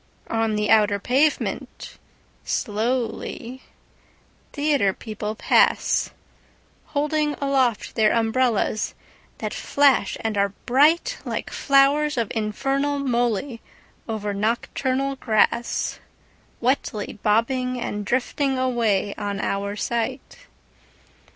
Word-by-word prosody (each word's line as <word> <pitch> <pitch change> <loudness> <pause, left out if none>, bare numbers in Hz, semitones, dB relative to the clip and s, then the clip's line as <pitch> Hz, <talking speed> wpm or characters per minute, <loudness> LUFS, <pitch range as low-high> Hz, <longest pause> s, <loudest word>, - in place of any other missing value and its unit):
On 225 -1 +1
the 210 0 0
outer 210 -2 +4
pavement, 270 +9 -1 0.4
slowly, 240 +2 -2 0.9
Theatre 285 -9 +1
people 215 0 -5
pass, - - +2 0.8
Holding 300 0 0
aloft 265 -5 0
their 215 -2 +3
umbrellas 230 -2 +1 0.4
that - - -4
flash 280 -7 +2
and 220 -2 -1
are 200 -1 +1
brightLike 315 - +1
flowers 280 +1 +3
of 230 -4 -1
infernal 270 +7 -1
molyOver 230 -4 -3
nocturnal 260 +5 -1
grassWetly 235 0 -2
bobbing 250 +4 +1
and 210 -3 -3
drifting 260 +4 0
away 230 -6 +1
on 205 -1 -3
our 200 +1 -2
sight. 250 - -4
240 Hz, 85 wpm, -23 LUFS, 215-275 Hz, 0.9 s, outer